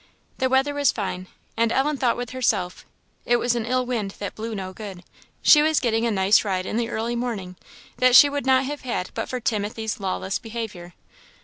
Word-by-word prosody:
The 260 Hz, -1 st, +1 dB
weather 265 Hz, +2 st, +2 dB
was 285 Hz, -1 st, +2 dB
fine, 185 Hz, -3 st, -4 dB, 0.3 s
and 230 Hz, 0 st, +1 dB
Ellen 285 Hz, +4 st, +1 dB
thought 255 Hz, -3 st, +1 dB
with 245 Hz, -1 st, -5 dB
herself, 215 Hz, -8 st, -1 dB, 0.4 s
it 240 Hz, -, +2 dB
was 240 Hz, 0 st, +1 dB
an 235 Hz, -2 st, -2 dB
ill 255 Hz, +1 st, +1 dB
wind 220 Hz, -6 st, -3 dB
that 200 Hz, -, -5 dB
blew 225 Hz, 0 st, -5 dB
no 190 Hz, -2 st, -5 dB
good. 195 Hz, -3 st, -9 dB, 0.4 s
She 300 Hz, -, +7 dB
was 310 Hz, 0 st, +3 dB
getting 230 Hz, -1 st, 0 dB
a -, -, 0 dB
nice 195 Hz, +1 st, +4 dB
ride 185 Hz, -3 st, -2 dB
in 215 Hz, -, -3 dB
the 235 Hz, -1 st, -1 dB
early 235 Hz, +1 st, -2 dB
morning, 220 Hz, -7 st, -4 dB, 0.4 s
that 255 Hz, -1 st, +4 dB
she 290 Hz, -, +10 dB
would 285 Hz, -2 st, -3 dB
not 260 Hz, 0 st, +4 dB
have 290 Hz, +2 st, -5 dB
had 235 Hz, -8 st, -3 dB
but -, -, -4 dB
for 255 Hz, -, -3 dB
Timothy's 220 Hz, -1 st, -2 dB
lawless 190 Hz, 0 st, -2 dB
behaviour. 220 Hz, -7 st, -7 dB
230 Hz, 205 wpm, -23 LUFS, 200-255 Hz, 0.4 s, she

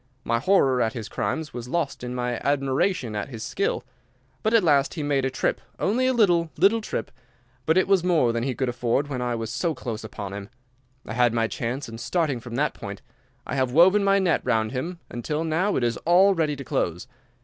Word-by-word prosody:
My 115 Hz, 0 st, +1 dB
horror 135 Hz, -5 st, +3 dB
at 115 Hz, +1 st, +1 dB
his 115 Hz, -5 st, -5 dB
crimes 160 Hz, -2 st, -3 dB
was 120 Hz, -1 st, -6 dB
lost 145 Hz, -2 st, -2 dB
in 125 Hz, 0 st, -4 dB
my 125 Hz, -1 st, -2 dB
admiration 135 Hz, -, 0 dB
at 105 Hz, +5 st, -3 dB
his 115 Hz, -4 st, -7 dB
skill. 200 Hz, -, -1 dB, 0.6 s
But 220 Hz, -, +1 dB
at 225 Hz, -, +5 dB
last 140 Hz, -4 st, +3 dB
he 155 Hz, -, -3 dB
made 140 Hz, -2 st, +1 dB
a -, -, +1 dB
trip—only 215 Hz, -, -1 dB
a 260 Hz, -, +2 dB
little, 175 Hz, -7 st, +3 dB
little 200 Hz, +7 st, +4 dB
trip—but 125 Hz, -, -4 dB
it 185 Hz, -, +3 dB
was 195 Hz, -3 st, +3 dB
more 160 Hz, -10 st, +3 dB
than 115 Hz, -, -1 dB
he 130 Hz, +1 st, -2 dB
could 130 Hz, -, -1 dB
afford 120 Hz, +3 st, 0 dB
when 130 Hz, -3 st, -3 dB
I 120 Hz, -1 st, -1 dB
was 115 Hz, -1 st, -4 dB
so 160 Hz, +6 st, -1 dB
close 115 Hz, -4 st, -5 dB
upon 100 Hz, -2 st, -6 dB
him. 100 Hz, 0 st, -7 dB, 0.6 s
I -, -, -6 dB
had 120 Hz, -1 st, +2 dB
my 115 Hz, -1 st, +2 dB
chance, 125 Hz, +5 st, -4 dB
and, 115 Hz, 0 st, -8 dB
starting 155 Hz, -4 st, 0 dB
from 120 Hz, 0 st, -8 dB
that 150 Hz, +4 st, +1 dB
point, 100 Hz, -2 st, -8 dB, 0.4 s
I -, -, -5 dB
have 130 Hz, -2 st, 0 dB
woven 185 Hz, +6 st, +6 dB
my 195 Hz, 0 st, +4 dB
net 185 Hz, -4 st, +2 dB
round 110 Hz, -3 st, +1 dB
him 160 Hz, +8 st, -4 dB
until 150 Hz, +6 st, -2 dB
now 170 Hz, +6 st, 0 dB
it 125 Hz, -, 0 dB
is 120 Hz, -1 st, 0 dB
all 185 Hz, +4 st, +4 dB
ready 155 Hz, -4 st, 0 dB
to 140 Hz, -, -7 dB
close. 85 Hz, -8 st, -2 dB
135 Hz, 215 wpm, -25 LUFS, 120-170 Hz, 0.6 s, woven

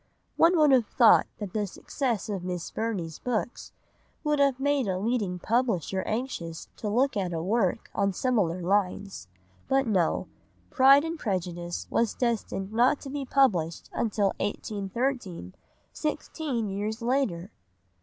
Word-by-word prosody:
One 340 Hz, +2 st, +5 dB
would 300 Hz, -2 st, +5 dB
have 250 Hz, -5 st, +4 dB
thought 235 Hz, -4 st, +5 dB
that 205 Hz, -4 st, -6 dB
the 210 Hz, -2 st, -1 dB
success 235 Hz, -, -3 dB
of 195 Hz, -4 st, -3 dB
Miss 180 Hz, -2 st, -4 dB
Burney's 195 Hz, -8 st, -3 dB
books 240 Hz, 0 st, -3 dB, 0.5 s
would 300 Hz, -2 st, +1 dB
have 275 Hz, -2 st, +3 dB
made 280 Hz, -3 st, +1 dB
a 185 Hz, -1 st, 0 dB
leading 205 Hz, -3 st, -1 dB
publisher 205 Hz, -, 0 dB
anxious 215 Hz, -9 st, -4 dB
to 210 Hz, -, -3 dB
look 255 Hz, +6 st, +2 dB
at 185 Hz, -4 st, -1 dB
a 165 Hz, -1 st, -2 dB
work 195 Hz, -1 st, 0 dB
on 200 Hz, 0 st, +1 dB
similar 185 Hz, -6 st, 0 dB
lines, 195 Hz, -, -1 dB, 0.4 s
but 270 Hz, 0 st, +2 dB
no—Pride 260 Hz, -, +2 dB
and 330 Hz, 0 st, -4 dB
Prejudice 175 Hz, -4 st, -3 dB
was 230 Hz, -2 st, +1 dB
destined 220 Hz, -4 st, -2 dB
not 245 Hz, +5 st, +3 dB
to 275 Hz, -, -7 dB
be 285 Hz, -1 st, -3 dB
published 185 Hz, -, +1 dB
until 205 Hz, -3 st, 0 dB
1813, 205 Hz, -, -3 dB, 0.4 s
sixteen 295 Hz, -5 st, -3 dB
years 210 Hz, +4 st, -3 dB
later! 230 Hz, -8 st, 0 dB
215 Hz, 135 wpm, -27 LUFS, 185-260 Hz, 0.5 s, One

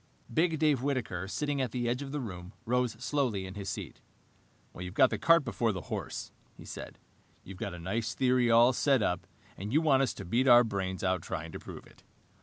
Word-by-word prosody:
Big 165 Hz, 0 st, +2 dB
Dave 150 Hz, -4 st, +2 dB
Whitaker, 120 Hz, -10 st, -2 dB
sitting 145 Hz, +5 st, -1 dB
at 130 Hz, -, 0 dB
the 120 Hz, +1 st, -2 dB
edge 125 Hz, +3 st, -1 dB
of 140 Hz, -1 st, -6 dB
the 150 Hz, -, -2 dB
room, 90 Hz, -6 st, -7 dB
rose 125 Hz, -1 st, +1 dB
slowly 120 Hz, -4 st, -1 dB
in 95 Hz, -, -7 dB
his 100 Hz, -1 st, -5 dB
seat. -, -, -6 dB, 0.8 s
"You've 90 Hz, +2 st, -7 dB
got 130 Hz, -1 st, +5 dB
the -, -, -2 dB
cart 165 Hz, -3 st, +5 dB
before 115 Hz, -4 st, 0 dB
the 95 Hz, -3 st, -5 dB
horse," -, -, -5 dB, 0.3 s
he -, -, -12 dB
said. -, -, -8 dB, 0.5 s
"You've 95 Hz, -1 st, -10 dB
got -, -, -4 dB
a -, -, -9 dB
nice 110 Hz, +7 st, -2 dB
theory 125 Hz, -2 st, +3 dB
all 120 Hz, +2 st, +6 dB
set 135 Hz, -2 st, +3 dB
up 90 Hz, -2 st, -1 dB, 0.3 s
and 100 Hz, +3 st, -6 dB
you 150 Hz, -, +4 dB
want 145 Hz, -4 st, +4 dB
us 135 Hz, -, 0 dB
to -, -, -7 dB
beat 120 Hz, +9 st, +1 dB
our 120 Hz, -1 st, +8 dB
brains 95 Hz, -4 st, -3 dB
out 95 Hz, -1 st, +1 dB
trying 80 Hz, -3 st, -5 dB
to -, -, -7 dB
prove -, -, -10 dB
it. -, -, -20 dB
120 Hz, 215 wpm, -30 LUFS, 95-135 Hz, 0.8 s, our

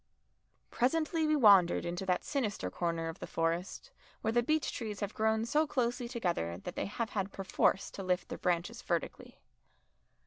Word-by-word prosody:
Presently 315 Hz, +5 st, +1 dB
we 305 Hz, -, +3 dB
wandered 200 Hz, -10 st, +6 dB
into 175 Hz, +2 st, -4 dB
that 180 Hz, -1 st, +1 dB
sinister 210 Hz, -, -2 dB
corner 165 Hz, -, -2 dB
of 165 Hz, +3 st, -6 dB
the -, -, -6 dB
Forest 165 Hz, +3 st, -2 dB, 0.3 s
where 220 Hz, -, 0 dB
the 240 Hz, +1 st, +3 dB
beech 310 Hz, +4 st, 0 dB
trees 215 Hz, -4 st, -5 dB
have 205 Hz, 0 st, -3 dB
grown 220 Hz, -1 st, +1 dB
so 305 Hz, +6 st, +2 dB
closely 245 Hz, -2 st, -1 dB
together 175 Hz, -, -2 dB
that 95 Hz, -, -7 dB
they -, -, -2 dB
have 220 Hz, +2 st, -3 dB
had 195 Hz, -1 st, -2 dB
perforce 195 Hz, 0 st, +1 dB
to -, -, -7 dB
lift 185 Hz, -1 st, -1 dB
their -, -, -6 dB
branches 180 Hz, +7 st, -1 dB
vertically. 170 Hz, -3 st, -3 dB
205 Hz, 170 wpm, -32 LUFS, 175-240 Hz, 0.3 s, wandered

